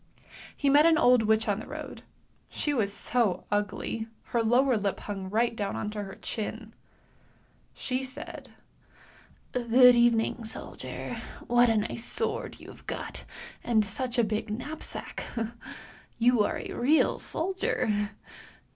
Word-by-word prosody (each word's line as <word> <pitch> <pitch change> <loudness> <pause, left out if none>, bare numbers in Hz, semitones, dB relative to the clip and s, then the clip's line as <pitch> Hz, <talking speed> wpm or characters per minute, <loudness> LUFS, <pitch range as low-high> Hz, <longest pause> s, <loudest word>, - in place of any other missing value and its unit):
He 285 - 0
met 290 +3 +7
an 325 -1 +5
old 250 -6 +6
witch 220 0 +2
on 205 0 +1
the - - -8
road, 305 +3 -7 0.5
she 295 - -1
was 215 -7 +1
so 210 -3 0
ugly, 205 +2 -1 0.3
her 235 - +3
lower 245 +3 +4
lip 205 -2 -1
hung 195 -2 -5
right 230 +3 +1
down 200 -3 -2
on 210 - -3
to 210 -1 -4
her 195 -1 -7
chin. 220 0 -5 1.0
She 255 0 -1
said, 260 0 -7 0.5
" - - -27
Good 250 0 +6
evening, 235 0 +3
soldier! 220 - -6 0.2
What 240 0 +5
a 225 - +3
nice 215 +2 -2
sword - - -3
you've - - -13
got, - - -5 0.4
and 220 -3 +3
such 255 +3 -3
a 235 - +5
big 215 0 -1
knapsack; 250 +9 -6 0.9
you 240 -2 +4
are - - -1
a - - -6
real 290 +6 +3
soldier! 250 - -1
230 Hz, 140 wpm, -28 LUFS, 210-250 Hz, 1.0 s, met